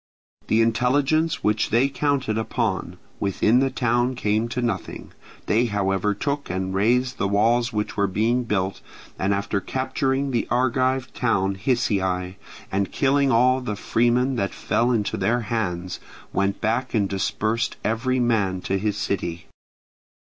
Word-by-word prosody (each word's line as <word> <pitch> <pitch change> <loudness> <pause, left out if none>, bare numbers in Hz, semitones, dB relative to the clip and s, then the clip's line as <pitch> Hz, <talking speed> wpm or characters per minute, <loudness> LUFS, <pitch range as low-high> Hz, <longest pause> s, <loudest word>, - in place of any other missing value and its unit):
The 115 +1 +3
intelligence 135 +8 +1
which 105 0 +1
they 120 +4 +3
counted 140 -4 0
upon 110 0 -2 0.2
within 105 +4 +2
the 135 0 +2
town 120 0 0
came 110 0 0
to 125 - -3
nothing; 115 -7 -3 0.3
they 115 +3 +2
however 100 -1 0
took 140 +5 -3
and 95 0 -2
razed 125 +6 +1
the 100 - +1
walls 115 +4 +2
which 105 -1 -2
were 100 -1 +2
being 115 +6 +1
built, 95 -3 -1 0.4
and 95 +1 +1
after 100 0 -1
capturing 135 +2 -1
the 120 -2 0
Argive 130 +1 +1
town 100 -5 +1
Hysiae 95 -5 0 0.4
and 100 0 -1
killing 140 0 +2
all 125 +3 +4
the 115 -5 -3
freemen 120 +5 +1
that 100 -3 -2
fell 120 +2 +1
into 110 -4 0
their 120 +2 +1
hands, 95 -6 -3 0.3
went 100 0 0
back 115 +4 -1
and 100 -3 +2
dispersed 110 +4 -1
every 125 +4 0
man 105 -6 +1
to 95 +1 -1
his 105 0 -1
city. 85 -4 -3
115 Hz, 145 wpm, -23 LUFS, 100-125 Hz, 0.4 s, all